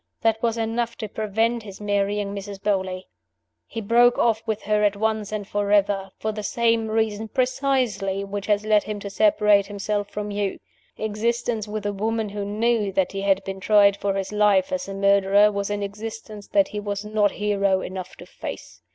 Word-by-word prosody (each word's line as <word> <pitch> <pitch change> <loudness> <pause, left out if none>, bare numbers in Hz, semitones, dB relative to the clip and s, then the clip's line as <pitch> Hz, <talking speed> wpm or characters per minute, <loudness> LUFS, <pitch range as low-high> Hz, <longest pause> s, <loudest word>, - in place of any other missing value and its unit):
That 225 -1 +2
was 230 -1 0
enough 230 +1 -1
to 215 - -4
prevent 220 +3 0
his 200 -3 -10
marrying 205 0 -1
Mrs. 200 0 -6
Beauly. 190 -2 -1 0.6
He 225 - -5
broke 240 +3 +4
off 225 -2 +2
with 220 -1 -2
her 210 0 +1
at 205 -1 +3
once 220 0 -1
and 210 -2 -4
forever 205 -1 +1
for 220 - -2
the 210 0 -5
same 230 +1 +1
reason 220 0 -1
precisely 250 -6 0
which 200 0 -5
has 210 0 +1
led 215 -1 +4
him 210 -1 -4
to 200 - -6
separate 210 -7 +4
himself 205 0 -2
from 210 0 -4
you. 200 -1 -2 0.4
Existence 220 +1 -1
with 210 0 -5
a 205 - -1
woman 220 +2 -1
who 205 0 -4
knew 215 0 0
that 190 -1 +1
he 195 - -4
had 195 -1 +2
been 195 0 -5
tried 200 0 +5
for 200 -1 -2
his 195 0 -3
life 210 -3 +3
as 185 - -2
a 195 - -6
murderer 200 +1 +4
was 200 0 -2
an 205 0 -2
existence 215 0 -7
that 200 -1 +2
he 210 - -4
was 205 0 -4
not 210 -1 +1
hero 200 -2 +1
enough 185 -1 -6
to - - -12
face. - - -8
205 Hz, 190 wpm, -24 LUFS, 200-220 Hz, 0.6 s, tried